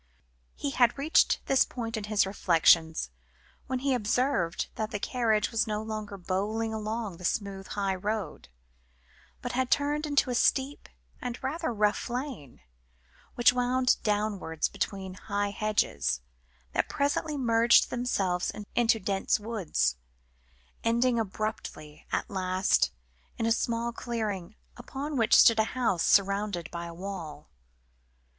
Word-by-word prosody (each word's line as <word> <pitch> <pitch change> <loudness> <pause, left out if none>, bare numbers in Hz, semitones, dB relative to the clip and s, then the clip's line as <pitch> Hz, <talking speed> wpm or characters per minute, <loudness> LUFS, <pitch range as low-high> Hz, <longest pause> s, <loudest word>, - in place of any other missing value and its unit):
He 285 - -3
had 245 -1 +3
reached 295 +4 +3
this 270 - +4
point 230 -2 -5
in 215 -2 -4
his 210 -1 +2
reflections 165 - +3 0.6
when 260 - -1
he 270 +1 0
observed 235 -5 0
that 215 -1 -3
the 210 - -3
carriage 220 -1 0
was 225 0 +1
no 215 0 -2
longer 215 -2 -5
bowling 205 +5 -2
along 215 -3 -3
the 180 - -12
smooth 195 +1 -2
high 200 -1 -1
road, 205 - -4 0.9
but 245 - -3
had 255 0 0
turned 295 +1 +1
into 285 -3 +2
a - - 0
steep, 265 +3 +1 0.3
and 245 -1 -4
rather 315 +3 -2
rough 210 +1 0
lane, 245 - -5 0.7
which 240 0 +5
wound 250 +1 +2
downwards 205 -6 -1
between 190 -2 -4
high 205 +2 -2
hedges, 210 - 0 0.5
that - - 0
presently 290 +1 0
merged 235 -2 +4
themselves 195 -8 0 0.2
into 230 -2 +3
dense 195 +1 0
woods, 190 - -1 0.9
ending 235 +1 +2
abruptly 195 -8 -5
at - - -1
last 185 -2 +1 0.5
in 225 - -1
a 230 - +2
small 235 +1 0
clearing, 215 -6 -4 0.2
upon 275 +4 -5
which 230 -3 +4
stood 230 -1 +7
a - - +6
house 225 -9 +1
surrounded 200 -3 +2
by 170 0 -5
a - - -7
wall. 170 -5 -7
215 Hz, 135 wpm, -28 LUFS, 195-245 Hz, 0.9 s, stood